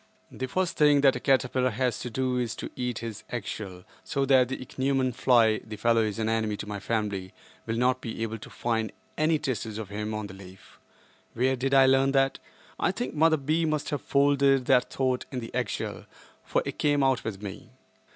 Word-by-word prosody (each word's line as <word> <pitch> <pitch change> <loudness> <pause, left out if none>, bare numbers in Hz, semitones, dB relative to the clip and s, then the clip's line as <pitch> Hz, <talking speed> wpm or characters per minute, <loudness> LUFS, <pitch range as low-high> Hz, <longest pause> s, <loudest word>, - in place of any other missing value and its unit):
The 130 - -4
first 185 +6 -1
thing 145 -2 +5
a 135 - +8
caterpillar 130 0 +1
has 125 0 -1
to 125 - -5
do 130 +1 -1
is 120 -2 -2
to - - -6
eat 125 -2 -2
his 110 -3 -6
eggshell 100 -5 -5 0.2
so 140 0 -1
that 130 -2 +5
the 135 - -3
ichneumon 130 0 -1
fly—the 110 -3 +2
fellow 115 +1 +3
is 110 -1 -1
an 110 -1 -1
enemy 110 -2 0
to - - -6
my 105 -1 -4
family—will 105 +1 -4
not 130 +2 +2
be 115 -1 -4
able 110 0 -4
to - - -11
find 115 -3 -1 0.2
any 155 +1 +2
traces 115 -7 -3
of 110 -3 -6
him 105 +1 -4
on 105 -1 -3
the 100 - -9
leaf. 95 -1 -14 0.6
Where 130 +3 +2
did 135 +2 0
I 135 -1 +7
learn 135 +1 +4
that? 135 0 +2 0.4
I - - +2
think 125 - -4
Mother 160 +1 +4
B. 155 +4 0
must 155 -2 -1
have 145 -3 -2
folded 140 -2 +3
that 125 -1 +3
thought 130 -1 0
in 130 - -3
the 115 - -8
eggshell, 125 -5 -3 0.4
for - - 0
it - - -5
came 145 -1 +2
out 135 -2 +2
with 105 -2 -5
me. 100 -2 -8
125 Hz, 200 wpm, -27 LUFS, 110-135 Hz, 0.6 s, a